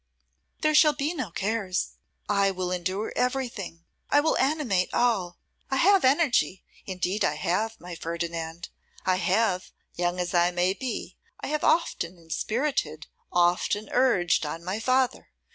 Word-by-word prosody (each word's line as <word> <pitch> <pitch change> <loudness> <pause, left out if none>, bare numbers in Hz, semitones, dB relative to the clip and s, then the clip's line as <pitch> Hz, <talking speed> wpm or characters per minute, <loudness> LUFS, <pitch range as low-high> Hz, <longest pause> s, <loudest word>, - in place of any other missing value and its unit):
'There 310 -1 +2
shall 300 0 +6
be 290 +3 -2
no 260 - -4
cares; 195 +1 -2 0.4
I 200 -1 +3
will 185 -1 -3
endure 185 +4 -2
everything; 235 -10 -2 0.2
I 290 - +5
will 310 +2 +2
animate 260 -10 +1
all. 195 -8 +1 0.3
I 270 - 0
have 390 +7 +5
energy; 260 - +2 0.2
indeed 190 +2 -1
I 150 - +1
have, 195 +9 -1
my 175 0 -8
Ferdinand. 165 0 -4 0.4
I 185 -1 +2
have, 190 -1 +1 0.2
young 175 +1 -1
as 180 0 -2
I 175 0 +4
may 180 +1 +1
be, 255 +4 -5 0.2
I - - -4
have 305 0 -1
often 180 - +1
inspirited, 165 - -2 0.3
often 180 +4 +1
urged 235 -12 +3
on 160 +2 -5
my 185 +4 -3
father. 255 +2 +1
190 Hz, 145 wpm, -26 LUFS, 175-255 Hz, 0.4 s, shall